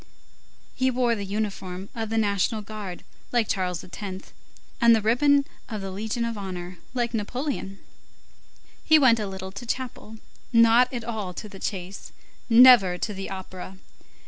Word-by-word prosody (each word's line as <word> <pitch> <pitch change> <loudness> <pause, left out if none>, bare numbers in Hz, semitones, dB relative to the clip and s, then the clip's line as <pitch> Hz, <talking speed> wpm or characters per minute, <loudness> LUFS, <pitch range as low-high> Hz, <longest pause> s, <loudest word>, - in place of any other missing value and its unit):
He 260 0 +1
wore 245 -2 +1
the 205 -3 -3
uniform 195 -2 -4
of 225 -2 -4
the 225 - -1
national 210 +1 +1
guard, 205 -4 -7 0.3
like 235 -3 +2
Charles 180 -3 -2
X., 180 - -11 0.8
and 235 -1 +7
the - - +2
ribbon 280 +5 +4 0.2
of 215 -3 -4
the 195 0 -5
Legion 220 +4 -2
of 230 -2 -4
Honor, 180 -2 -6 0.2
like 240 -1 -1
Napoleon. 230 -2 -3 1.1
He 315 - +6
went 255 -6 +5
a 210 - -2
little 190 0 -7
to 200 +4 -8
chapel, 240 -2 -5 0.3
not 230 +1 +5
at 240 -3 -4
all 215 -6 -4
to 215 - -6
the 195 -2 -11
chase, 190 0 -5 0.4
never 230 -6 +8
to 210 - -3
the 195 0 -6
opera. 190 0 -8
215 Hz, 155 wpm, -25 LUFS, 190-235 Hz, 1.1 s, never